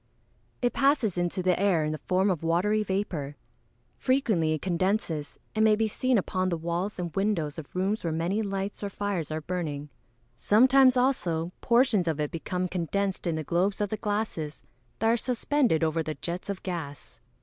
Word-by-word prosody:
_ - - -42 0.6
It 245 - +2
passes 275 - +2
into 175 +1 -1
the 180 -1 +2
air 190 -5 +3
in 155 - -1
the 155 - -4
form 190 +2 +1
of 175 - -2
watery 180 +6 +2
vapour. 190 -8 -2 0.6
Frequently 215 -12 +2
it 155 - -3
condenses, 180 -4 -1 0.2
and 220 - +2
may 215 -1 +5
be 220 +1 +1
seen 255 +3 +1
upon 185 -1 0
the 170 - -1
walls 170 +5 -2
and 175 -3 -4
windows 175 -7 0
of 155 - -11
rooms 195 +4 0
where 165 - -1
many 170 +7 0
lights 195 -1 -3
or 200 - -2
fires 200 -5 -3
are 155 0 -3
burning. 150 -4 -4 0.5
Sometimes, 255 +4 +5
also, 175 -11 +1
portions 235 -7 +3
of 155 -2 0
it 150 -1 -1
become 180 +2 -2
condensed 185 +2 -2
in 165 - 0
the 160 - -3
globes 180 +6 0
of 205 -1 0
the 215 - -2
glasses 205 -8 -3 0.3
that 225 - +1
are 230 +1 +4
suspended 250 - +1
over 160 0 +1
the 155 -1 -4
jets 175 +3 -5
of 200 -2 -4
gas. 160 -7 -6
185 Hz, 185 wpm, -28 LUFS, 165-210 Hz, 0.6 s, may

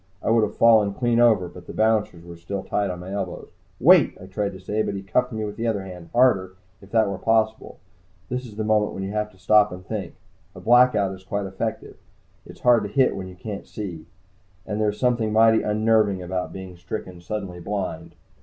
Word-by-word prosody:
I - - +1
would 115 0 +4
have 105 -1 -2
fallen 110 -4 +5
clean 120 -2 +1
over, 110 -7 +4
but 90 0 -13
the - - -8
bouncers 110 -6 +1
were 85 0 -10
still 95 +4 -5
tight 100 -1 -1
on 90 -1 -5
my 90 +2 -8
elbows. 100 -3 -5 0.3
"Wait!" - - +5
I 95 - -10
tried 100 +1 -3
to 95 - -10
say, 105 +4 -2
but 100 - -2
he 100 - -5
cuffed 125 +6 0
me 110 -1 -3
with 105 - -7
the 115 +1 -2
other 105 -4 -1
hand, 90 -3 -10
harder, 100 -7 +3 0.3
if 100 - -15
that 110 -1 +3
were 100 -1 -4
possible. 110 0 0 0.5
This 125 +1 -3
is 105 - -12
the 110 - -2
moment 105 -1 +1
when 95 - -5
you 95 - -4
have 105 0 -2
to 95 - -22
stop 105 +2 +4
and 90 0 -9
think. 100 -6 -5 0.4
A - - -9
Blackout 120 -5 +4
is 95 0 -12
quite 100 +1 -3
effective 95 0 -5 0.5
it's - - -13
hard 120 -2 +5
to - - -5
hit 130 +5 +2
what 95 -1 -6
you 90 - -11
can't 100 +2 -7
see. 90 -7 -7 0.6
And 105 0 -3
there's 105 -1 0
something 120 -4 +1
mighty 110 +1 +5
unnerving 105 -3 +2
about 90 0 -3
being 95 -2 -9
stricken 90 0 -7
suddenly 95 -1 -5
blind. 95 -3 -5
105 Hz, 220 wpm, -23 LUFS, 95-110 Hz, 0.6 s, fallen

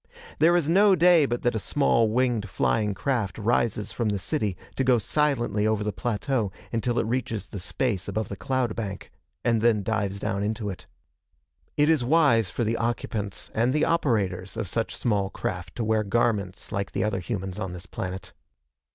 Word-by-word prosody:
There 170 +2 +5
is 165 -4 0
no 195 +4 +5
day 170 -4 +5
but 120 -1 -3
that 120 - +2
a 110 - -1
small, 115 -2 +2
winged 115 -3 +1
flying 100 - +1
craft 120 -4 -1
rises 110 -1 0
from 115 -3 -1
the 100 - 0
city 105 - -2 0.2
to 135 - +1
go 125 -1 +4
silently 120 -5 +1
over 110 -1 +1
the 105 -1 -2
plateau 120 -1 -1 0.2
until 120 +1 0
it - - +2
reaches 115 -2 -2
the 100 - -7
space 100 +1 -1
above 105 +1 -2
the 100 - -5
cloud 120 +5 -1
bank, 100 -4 -5 0.3
and 115 -2 +3
then 110 -3 +3
dives 100 -2 -1
down 100 0 -2
into 105 0 -2
it. 90 - -10 0.9
It 150 - +4
is 155 -5 +3
wise 120 - +4
for 120 - -2
the 115 +1 0
occupants 110 -4 -3
and 120 +3 +2
the 150 +1 +2
operators 105 - 0
of 110 -3 -2
such 115 +5 -2
small 100 -5 0
craft 90 -2 -5
to 120 - -2
wear 110 0 +2
garments 100 -3 -1
like 100 -1 -3
the - - 0
other 105 -3 0
humans 95 0 -4
on 95 -4 -4
this 90 +1 -8
planet. 95 0 -6
110 Hz, 185 wpm, -26 LUFS, 100-125 Hz, 0.9 s, There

